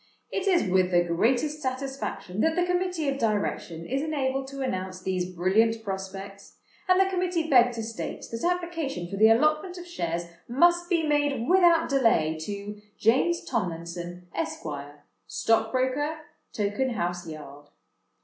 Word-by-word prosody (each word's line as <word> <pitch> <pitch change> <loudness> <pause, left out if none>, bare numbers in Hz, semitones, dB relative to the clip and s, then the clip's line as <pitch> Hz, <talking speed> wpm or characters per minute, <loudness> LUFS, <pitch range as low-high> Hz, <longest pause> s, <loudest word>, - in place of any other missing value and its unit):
"It 395 0 -2
is 360 - +3
with 185 0 +3
the 175 -1 +4
greatest 245 - +1
satisfaction 260 -7 -3
that 320 0 +2
the 355 0 +2
Committee 360 -3 -1
of 275 0 -1
Direction 205 -7 -1
is 270 +7 -1
enabled 270 -3 -1
to 275 0 -5
announce 185 -6 -3
these 185 -1 -2
brilliant 215 +6 +2
prospects; 195 0 -7 0.3
and 370 0 +5
the 385 - +6
Committee 360 -3 -1
beg 245 -4 +6
to 230 -1 -4
state 225 0 -5
that 230 0 -5
application 330 - -3
for 195 +2 -6
the 220 +2 +7
allotment 305 +9 +2
of 355 - -8
Shares 170 - -3 0.2
must 345 +7 +3
be 335 -3 +2
made 290 -5 +1
without 345 -3 +5
delay 225 - +3
to 205 +3 -6 0.2
James 265 +10 +2
Tomlinson, 175 -4 -4
Esq., 165 - -4 0.6
Stockbroker, 260 +6 +1 0.3
Tokenhouse 205 -5 -1
Yard. 145 -1 -10
240 Hz, 140 wpm, -27 LUFS, 185-310 Hz, 0.6 s, the